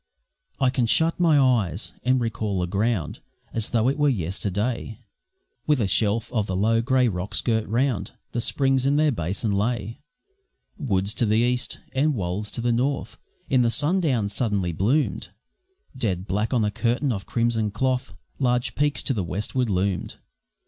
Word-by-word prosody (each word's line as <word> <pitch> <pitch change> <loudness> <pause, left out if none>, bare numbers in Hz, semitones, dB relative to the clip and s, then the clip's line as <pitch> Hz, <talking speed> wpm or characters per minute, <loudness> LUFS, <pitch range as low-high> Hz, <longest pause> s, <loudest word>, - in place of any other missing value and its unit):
I 130 -2 +3
can 125 -3 +1
shut 165 +8 +2
my 165 -4 +4
eyes 115 - +1
and 130 +1 +2
recall 110 -4 -2
the 90 - 0
ground 100 -1 -1 0.3
As 115 -1 0
though 115 0 +2
it 140 +3 0
were 145 0 +4
yesterday 105 +3 -2 0.7
With 150 -3 +3
a 110 - +2
shelf 105 +4 +1
of 110 -4 0
the 95 - -2
low, 115 +4 +2
grey 130 +1 +3
rocks 95 -2 -2
girt 110 -2 0
round, 115 -3 0 0.2
The 120 - -1
springs 135 +1 +1
in 140 - +3
their 150 0 +3
basin 100 - -2
lay; 110 +4 -1 0.8
Woods 100 - 0
to 120 - +1
the 105 +1 +3
east 125 +2 0 0.2
and 145 +2 +2
wolds 100 +1 -3
to - - -3
the 120 0 +1
north 135 +4 -1 0.3
In 130 -2 +3
the 120 - +3
sundown 145 - +1
sullenly 100 -5 0
bloom'd; 105 - 0 0.7
Dead 95 -8 -1
black 105 +3 -1
on 120 -5 +2
a 105 - 0
curtain 125 +6 0
of 95 -6 -4
crimson 115 -2 +1
cloth 130 +4 -1 0.3
Large 125 -1 +1
peaks 145 0 0
to 135 - 0
the 105 -6 -1
westward 105 +7 -2
loomed. 95 -1 -1
115 Hz, 170 wpm, -24 LUFS, 100-130 Hz, 0.8 s, my